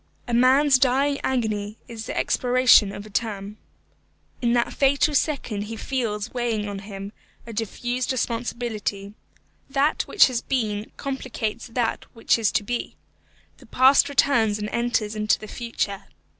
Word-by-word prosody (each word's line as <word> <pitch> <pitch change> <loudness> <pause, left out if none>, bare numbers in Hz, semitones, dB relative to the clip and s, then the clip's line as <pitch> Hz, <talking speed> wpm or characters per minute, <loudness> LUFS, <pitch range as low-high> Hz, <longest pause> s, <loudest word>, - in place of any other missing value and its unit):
A 240 - -3
man's 260 +3 +5
dying 275 +2 +2
agony 215 -4 -1
is 225 -2 -8
the - - -4
expiration 250 -5 +4
of 200 - -8
a - - -11
term. 210 -1 -3 0.8
In 235 -1 +2
that 240 -1 +1
fatal 280 +2 +2
second 255 -8 -1
he 225 +2 -6
feels 220 -3 -3
weighing 230 -4 -1
on 200 -1 -5
him 195 0 -8 0.3
a 230 - -8
diffused 240 +4 -2
responsibility. 230 -5 -3 0.6
That 275 +3 +1
which 415 - +6
has 245 -3 -1
been 215 -5 -2
complicates 250 -5 -4
that 230 -1 -2
which 230 0 +2
is 220 -2 +2
to 220 -1 +1
be. 240 +3 -4 0.6
The - - -18
past 260 +3 +5
returns 230 -7 +3
and 210 0 -4
enters 235 -3 -1
into 215 0 +2
the 215 - -10
future. 205 -4 -4
235 Hz, 145 wpm, -24 LUFS, 210-255 Hz, 0.8 s, which